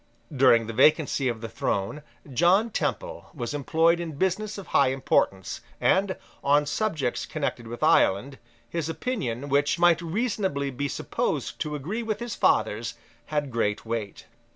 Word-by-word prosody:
During 125 -3 +5
the 115 - -5
vacancy 140 +1 +3
of 115 -3 -2
the 115 - -4
throne, 105 +4 -2 0.3
John 185 - +3
Temple - - -3
was 120 -1 -4
employed 160 +4 +2
in 170 -2 -4
business 190 +7 -1
of 200 - -7
high 140 - +3
importance; 130 -7 0 0.2
and, 190 0 +2 0.3
on 145 +1 +4
subjects 150 - -1
connected 140 -6 -3
with 120 +1 -6
Ireland, 130 +8 +3 0.3
his 165 +5 -3
opinion, 160 - -3
which 145 +1 +2
might 170 -1 +4
reasonably 185 - -1
be 140 +3 -2
supposed - - -2
to 150 -1 -2
agree 175 - -3
with 220 -2 -3
his 240 -2 -4
father's, 110 +1 +1 0.3
had 150 -3 -2
great 105 -3 -1
weight. 110 -3 -4
145 Hz, 150 wpm, -26 LUFS, 120-175 Hz, 0.3 s, During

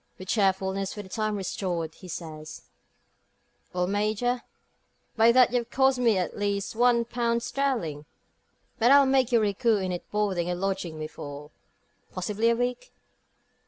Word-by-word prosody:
With 185 0 -10
cheerfulness 195 -1 0
for 205 - -6
the 190 - -14
time 215 0 -1
restored, 180 -4 -3
he 185 - -13
says: 155 -2 -8 1.1
"Well, 180 0 0
Major, 215 +5 0 0.7
by 225 +1 +6
that 250 0 +5
you've 240 -1 0
cost 265 0 +2
me 230 -5 +3
at 180 - -1
at - - -10
least 200 0 -2
one 235 0 +3
pound 235 -1 -1
sterling. 230 - -2 0.7
But 235 +1 +4
I'll 280 0 +7
make 265 -2 +2
you 235 - +5
recoup 215 +1 +2
it 185 - -2
in 175 - -3
boarding 195 -5 -1
and 175 0 -2
lodging 185 -4 -2
me 155 - -4
for 145 0 -9 0.6
possibly 210 +5 0
a 235 - +3
week." 245 - -3
210 Hz, 160 wpm, -27 LUFS, 185-235 Hz, 1.1 s, I'll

